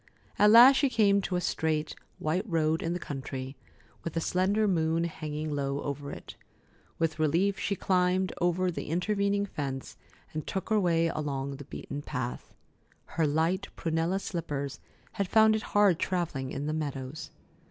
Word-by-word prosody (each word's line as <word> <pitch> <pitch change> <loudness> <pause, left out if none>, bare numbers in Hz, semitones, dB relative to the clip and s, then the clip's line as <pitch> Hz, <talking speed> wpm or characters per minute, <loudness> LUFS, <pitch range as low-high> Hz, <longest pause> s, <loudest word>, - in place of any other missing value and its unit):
At 210 - +7
last 245 +5 +9
she 280 - +3
came 200 -4 +3
to 190 - -2
a 180 - 0
straight, 155 -3 -1 0.2
white 160 +4 0
road 160 -1 +1
in 165 - -1
the - - -1
country, 135 -2 -6 0.5
with 165 - -4
the 165 - 0
slender 195 +6 +1
moon 165 -3 +1
hanging 155 -2 -4
low 140 0 -1
over 140 0 -4
it. - - -9 0.6
With 160 -1 -1
relief, 175 +6 +2
she 200 - -1
climbed 185 0 +1
the 175 0 0
intervening 200 +3 +1
fence 135 -7 -5 0.4
and 155 -1 -4
took 190 - -3
her 215 -1 +3
way 165 -3 +2
along 140 -3 -3
the 145 - -9
beaten 145 0 -6
path. 125 -3 -5 0.6
Her 160 -2 +2
light 165 +6 +1
prunella 165 +2 0
slippers 145 -7 -4 0.3
had 200 - -2
found 220 +2 +5
it 215 - -1 0.2
hard 200 -5 +5
travelling 165 -8 -2
in 140 +2 -4
the 155 - -1
meadows. 145 -2 -4
165 Hz, 160 wpm, -29 LUFS, 145-190 Hz, 0.6 s, last